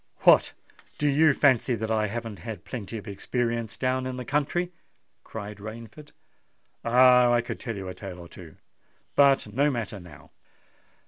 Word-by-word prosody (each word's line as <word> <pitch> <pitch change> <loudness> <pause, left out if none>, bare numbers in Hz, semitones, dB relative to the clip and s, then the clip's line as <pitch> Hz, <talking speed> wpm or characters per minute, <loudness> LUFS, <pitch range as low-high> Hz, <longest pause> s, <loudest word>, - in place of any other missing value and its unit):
"What! - - +5 0.4
do 150 - 0
you 145 0 +4
fancy 130 -3 +3
that 110 0 -3
I 110 -1 +1
haven't 115 -1 -5
had 110 -6 -8
plenty 115 -2 -6
of 105 - -10
experience 115 +2 -3
down 130 0 0
in 130 0 -5
the 125 - -6
country?" 150 +7 -1 0.5
cried 105 -1 -8
Rainford. 115 +7 -10 0.7
"Ah! 125 0 +6
I 120 -1 +3
could 120 - -6
tell 115 -3 -5
you 95 -1 -6
a 90 - -5
tale 95 -2 -8
or 85 -1 -10
two—but 105 - -1
no 140 +5 +3
matter 115 -6 -4
now." 85 -6 -15
115 Hz, 155 wpm, -26 LUFS, 105-130 Hz, 0.7 s, Ah